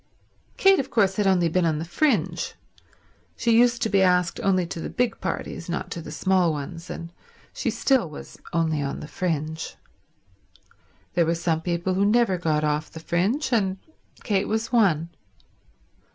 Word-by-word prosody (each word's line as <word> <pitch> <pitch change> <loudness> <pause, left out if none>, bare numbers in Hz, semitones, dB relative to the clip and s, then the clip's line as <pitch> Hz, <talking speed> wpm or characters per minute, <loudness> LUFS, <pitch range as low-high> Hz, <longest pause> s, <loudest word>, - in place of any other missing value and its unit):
Kate, 390 -1 +5
of 270 - -2
course, 195 -4 +2
had 205 -2 +2
only 180 -3 +3
been 180 +2 +1
on 160 -2 +1
the 160 - -4
fringe; 280 - 0 0.8
she 235 - +1
used 240 0 +4
to - - +2
be 195 -2 +3
asked 180 -2 +2
only 185 -2 +2
to 170 - -6
the - - -4
big 245 -2 -1
parties, 185 -2 -4
not 180 +2 -3
to 170 - -4
the - - -9
small 185 -3 +2
ones, 165 +4 -6
and 170 0 -7 0.4
she - - -2
still 260 - +1
was 150 - -11
only 160 -3 0
on 140 -1 -3
the - - -8
fringe. 160 -2 -3 1.4
There 170 -2 +2
were 165 - +2
some 165 -1 0
people 175 +2 -1
who 195 +2 +1
never 210 -3 +3
got 155 -3 0
off 150 +1 0
the 160 - -9
fringe, 200 - 0
and 195 -4 +1 0.5
Kate 200 -3 0
was 220 +1 -2
one. 175 -9 +3
180 Hz, 170 wpm, -24 LUFS, 165-205 Hz, 1.4 s, Kate